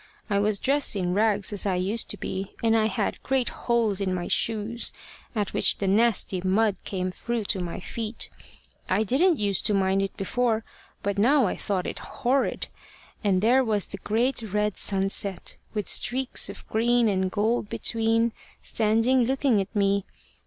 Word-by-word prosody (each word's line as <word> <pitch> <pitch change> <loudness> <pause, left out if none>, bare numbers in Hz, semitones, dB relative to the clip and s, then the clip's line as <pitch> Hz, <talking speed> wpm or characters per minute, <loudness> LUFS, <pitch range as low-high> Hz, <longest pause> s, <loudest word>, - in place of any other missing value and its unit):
I 200 - +3
was 205 0 +2
dressed 275 +1 +1
in 180 -2 -1
rags 205 0 +2
as 205 0 0
I 190 - +1
used 195 +6 -1
to 205 - -1
be, 190 0 -5
and 225 0 +3
I 220 -1 +3
had 220 -2 -2
great 265 -2 0
holes 225 -5 0
in 185 -2 0
my 175 -1 -3
shoes, 225 +1 0 0.4
at 205 -2 -1
which - - +2
the 200 - -2
nasty 200 -2 +2
mud 195 +2 +2
came 185 -2 -3
through 235 +4 -3
to 190 - -5
my 175 -1 -5
feet. 225 -1 -5 0.6
I 195 +4 +2
didn't 310 - +3
use 200 -2 +1
to 210 - +1
mind 190 0 +2
it 195 -1 -4
before, 225 +2 0 0.4
but 200 0 -1
now 265 +4 +4
I 185 - -1
thought 190 -3 -2
it - - -4
horrid. 260 +2 -1 0.6
And 195 -2 +2
there 255 +4 +4
was 215 -4 +1
the 195 - -3
great 235 +6 0
red 210 -1 -1
sunset, 195 -1 0 0.2
with 210 -2 -2
streaks 260 +1 +2
of - - -10
green 235 +1 +2
and 190 -2 +1
gold 215 +2 0
between, 230 0 +1 0.3
standing 225 +3 +2
looking 265 -4 +2
at 195 - -7
me. 200 -1 +2
210 Hz, 175 wpm, -26 LUFS, 195-235 Hz, 0.6 s, now